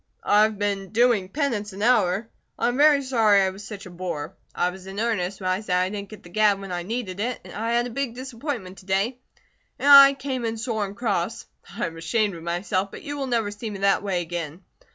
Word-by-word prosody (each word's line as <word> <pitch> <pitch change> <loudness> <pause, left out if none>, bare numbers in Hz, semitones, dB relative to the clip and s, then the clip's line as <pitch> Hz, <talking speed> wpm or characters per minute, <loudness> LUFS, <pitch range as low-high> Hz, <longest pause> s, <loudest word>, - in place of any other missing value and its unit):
"I 210 - +4
have 215 -1 +2
been 200 -1 -2
doing 225 -4 +2
penance 215 -6 -2
an 200 +2 -5
hour. 215 -3 +3 0.3
I - - +1
am 245 - -2
very 290 -1 +5
sorry 225 -6 +4
I 190 - +1
was 195 +2 -11
such 205 -1 -8
a 185 - -10
boor. 170 -2 -5 0.2
I 180 - +1
was 190 +1 -12
in 195 +1 -6
earnest 200 -5 -1
when 185 - -4
I 185 +2 -1
said 180 -4 0
I 185 +1 +1
didn't 200 -1 -6
get 215 -2 -12
the 175 - -13
gad 205 +1 +3
when 195 -1 -8
I 175 -1 -2
needed 200 -1 -4
it. 240 +3 -3
I 225 +2 -2
had 240 0 +2
a 245 - -6
big 250 -1 -3
disappointment 245 -6 -6
to 185 - -18
day, 200 +7 0 0.6
and - - -2
I 275 -1 +10
came 265 -3 -4
in 225 0 -2
sore 220 -3 -2
and 195 - -11
cross. 205 -8 -1 0.3
I - - 0
am 165 0 -6
ashamed 205 +5 0
of 165 - -9
myself, 185 +3 -1
but - - -10
you 290 0 -5
will 275 -2 -3
never 230 -4 0
see 210 +2 -6
me 205 - -6
that 200 0 +3
way 190 -4 -1
again. 170 0 -6
205 Hz, 240 wpm, -24 LUFS, 185-235 Hz, 0.6 s, I